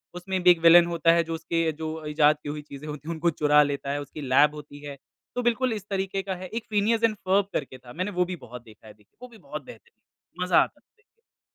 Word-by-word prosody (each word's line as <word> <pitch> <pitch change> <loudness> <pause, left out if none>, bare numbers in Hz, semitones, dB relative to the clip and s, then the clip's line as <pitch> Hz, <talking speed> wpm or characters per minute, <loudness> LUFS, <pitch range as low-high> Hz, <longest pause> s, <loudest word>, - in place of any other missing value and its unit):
उसमें 185 +1 -3
भी 180 - +8
एक 170 - +2
विलेन 170 +1 +8
होता 170 -1 +2
है, 170 0 +3
जो 165 - -5
उसके 165 0 -1
जो 155 0 -6
इजाद 150 0 +3
की 145 - -5
हुई 150 0 -5
चीज़ें 145 0 -11
होती 150 0 -8
हैं, 170 - -2
उनको 165 +2 0
चुरा 150 -1 +4
लेता 140 -1 -3
है, 145 - -2
उसकी 145 +1 -9
लैब 145 +3 +3
होती 145 -1 -11
है। 140 -1 -7 0.4
तो 245 - 0
बिल्कुल 240 0 +1
इस 205 -1 -7
तरीके 195 0 -2
का 190 -1 -3
है। 185 +1 -8
एक 225 +5 -5
फ़िनियस 220 +2 +1
एंड 225 -1 +3
फ़र्ब 195 0 +1
करके 135 -3 -4
था, 125 -1 -14
मैंने 185 +4 -3
वो 180 -1 +1
भी 180 0 -5
बहुत 120 0 -10
देखा 110 -1 -17
है, 105 - -12
देखिए। 105 -1 -30
वो 250 - -9
भी 230 -2 -16
बहुत 185 - -8
बेहतरीन 470 0 -15 0.5
है, - - +2
मज़ा - - +3
आता - - -10
था। 455 +1 -41
165 Hz, 260 wpm, -26 LUFS, 150-195 Hz, 0.5 s, भी